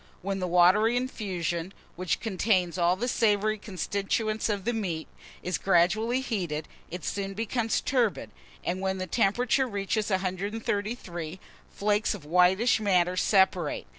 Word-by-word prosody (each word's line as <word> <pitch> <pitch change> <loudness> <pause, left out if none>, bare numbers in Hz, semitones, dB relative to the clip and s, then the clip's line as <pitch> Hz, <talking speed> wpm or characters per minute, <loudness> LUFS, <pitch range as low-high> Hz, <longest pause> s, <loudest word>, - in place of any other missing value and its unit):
When 195 0 -2
the 185 - -2
watery 185 +7 +4
infusion, 185 -8 -3 0.2
which 180 -2 -1
contains 185 -4 0
all 175 +1 +3
the 235 +6 -3
savoury 215 -2 +1
constituents 205 +3 -2
of 200 -2 -2
the 240 - +1
meat, 180 -8 -3 0.4
is 180 - -2
gradually 205 +7 +2
heated, 175 - -3 0.2
it 180 -1 -7
soon 195 -1 -3
becomes 225 +1 -1
turbid; 245 -6 0 0.3
and, 185 +2 -2
when 190 0 -1
the 185 - -3
temperature 240 +7 +1
reaches 205 0 -2
133°, 190 -2 -3 0.3
flakes 210 +1 0
of 175 -8 -11
whitish 180 +9 +4
matter 185 -4 +2
separate. 185 - +2
195 Hz, 135 wpm, -27 LUFS, 180-220 Hz, 0.4 s, watery